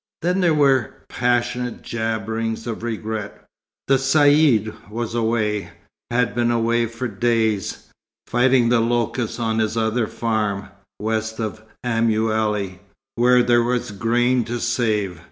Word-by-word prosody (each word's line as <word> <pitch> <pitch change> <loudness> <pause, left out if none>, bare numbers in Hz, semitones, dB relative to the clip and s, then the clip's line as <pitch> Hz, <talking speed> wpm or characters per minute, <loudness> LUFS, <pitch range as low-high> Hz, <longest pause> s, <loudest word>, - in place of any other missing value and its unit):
Then 180 +3 +1
there 170 -3 +3
were 135 -5 +2
passionate 125 0 -1
jabberings 110 0 -3
of 115 -2 -4
regret. 110 -2 -5 0.4
The 135 - +4
Caïd, 135 -6 +3
was 115 +1 -4
away, 110 -3 0 0.4
had 125 0 +1
been 120 -1 +1
away 115 0 +1
for 115 +3 -4
days, 110 -1 0 0.4
fighting 125 -1 +3
the 120 -1 +4
locusts 120 0 -1
on 110 -1 0
his 110 +1 0
other 110 0 +1
farm, 105 -4 -2 0.3
west 110 +1 -2
of 110 -1 -4 0.2
Aumale, 110 -4 0 0.3
where 125 +1 +4
there 120 0 +4
was 120 -2 -1
grain 120 +4 +1
to 120 +1 -3
save. 110 -7 0
115 Hz, 125 wpm, -21 LUFS, 110-120 Hz, 0.4 s, The